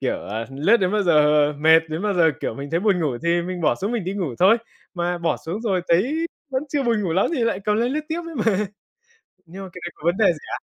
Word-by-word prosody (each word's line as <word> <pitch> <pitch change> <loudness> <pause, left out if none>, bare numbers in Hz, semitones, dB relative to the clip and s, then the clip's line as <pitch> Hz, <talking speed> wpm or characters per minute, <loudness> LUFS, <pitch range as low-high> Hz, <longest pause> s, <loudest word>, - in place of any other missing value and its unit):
Kiểu, - - -3
à, 110 +2 -3
lướt 155 +13 +3
đến 185 -2 0
bao 210 - +2
giờ 150 -4 +4
mệt, 160 +2 +6
đến 160 +3 -4
bao 210 -2 0
giờ 165 -2 +4
kiểu - - -3
mình 140 +3 -7
thấy 165 - 0
buồn 195 -3 +2
ngủ 135 -7 -1
thì 170 +1 +1
mình 180 0 -5
bỏ 150 - +2
xuống 205 +5 -3
mình 225 -7 -2
đi 190 - -3
ngủ 175 -11 -3
thôi. 195 +6 +6 0.4
Mà 175 0 -1
bỏ 170 - 0
xuống 180 +7 -6
rồi 195 -6 0
thấy 270 - +2 0.2
vẫn 260 +1 -1
chưa 285 0 -1
buồn 230 -4 +1
ngủ 175 -4 -1
lắm 190 - +2
thì 245 - 0
lại 225 -4 -1
cầm 210 0 +1
lên 240 +3 0
lướt 305 - -1
tiếp 330 +2 -2
ấy 330 - -8
mà. 210 -4 +1 0.8
Nhưng 190 +4 -9
mà 190 - -7
cái 180 - -10
đấy 175 - -4
có - - -21
vấn 175 +2 +2
đề 215 -2 +3
gì 155 - -9
ạ? - - -3
185 Hz, 280 wpm, -22 LUFS, 165-220 Hz, 0.8 s, mệt